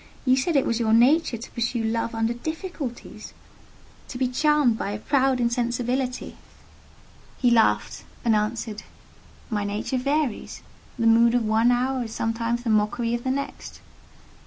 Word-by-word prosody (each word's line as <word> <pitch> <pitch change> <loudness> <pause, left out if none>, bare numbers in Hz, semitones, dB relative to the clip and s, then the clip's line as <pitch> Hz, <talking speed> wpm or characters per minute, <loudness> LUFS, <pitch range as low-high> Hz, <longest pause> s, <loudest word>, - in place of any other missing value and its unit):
you 255 0 +5
said 285 +5 0
it 275 - +3
was 230 - 0
your 220 -2 +2
nature 255 +3 +4
to 230 - -10
pursue 235 0 -2
Love 230 +1 -1
under 225 +1 0
difficulties—to 295 -3 -9
be 255 0 +1
charmed 295 -1 +2
by 210 - -3
a 205 - -3
proud 265 +2 +1
insensibility!". 245 +1 -1 1.0
He 245 -2 +2
laughed, 115 - +2 0.2
and 225 -2 +4
answered, 215 0 -2 0.7
"My 210 -2 -1
nature 210 +5 -2
varies: 280 -2 -2 0.3
the 230 - -1
mood 230 +1 +5
of 240 -2 +1
one 220 +2 +3
hour 250 +1 0
is 225 - -8
sometimes 230 +1 -1
the 230 - 0
mockery 215 +2 +1
of 240 0 -2
the 260 - -2
next. 280 +2 -4
240 Hz, 150 wpm, -24 LUFS, 225-260 Hz, 1.0 s, you